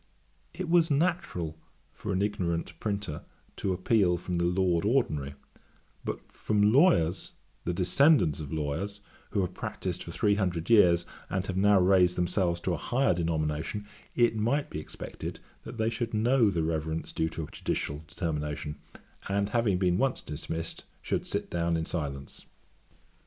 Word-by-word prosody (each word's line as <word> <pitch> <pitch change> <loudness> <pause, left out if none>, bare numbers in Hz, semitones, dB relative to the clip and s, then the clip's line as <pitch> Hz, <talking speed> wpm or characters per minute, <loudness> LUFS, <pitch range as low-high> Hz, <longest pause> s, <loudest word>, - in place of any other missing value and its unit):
It 185 - -5
was 170 0 +4
natural 145 - 0 0.3
for - - -5
an 95 +2 +1
ignorant 85 -5 -1
printer 100 -7 -3 0.4
to 95 - -1
appeal 95 -1 +2
from 90 0 -3
the 85 - +2
Lord 90 -1 +2
Ordinary; 75 - +1 0.7
but - - -5
from 105 0 +2
lawyers, 125 - +3 0.3
the 90 - 0
descendants 95 - +4
of 75 -3 -6
lawyers, 80 +7 -3 0.3
who 100 - 0
have 90 0 -2
practised 90 -1 -4
for - - -7
three 100 +4 +2
hundred 90 -2 -1
years, 85 -6 +6 0.2
and 95 0 -1
have 95 - -3
now 100 +1 +5
raised 90 -1 +4
themselves 90 -1 +1
to 90 - 0
a - - -1
higher 125 - +2
denomination, 80 +3 -1 0.3
it 120 -2 +4
might 120 +7 0
be 75 - -3
expected, 75 - -7 0.3
that 115 +1 -8
they 110 0 +1
should 115 0 -3
know 115 +1 +4
the 85 -4 0
reverence 80 0 -2
due 80 - 0
to 80 0 -5
a 75 - -9
judicial 75 +2 -3
determination; 75 -3 -3 0.5
and, 100 +1 +1
having 110 -4 +2
been 90 -1 +2
once 135 0 +1
dismissed, 80 +2 -5 0.2
should - - -1
sit - - -3
down 85 -1 +1
in 80 - -2
silence.' 70 -5 -5
90 Hz, 155 wpm, -29 LUFS, 80-105 Hz, 0.7 s, years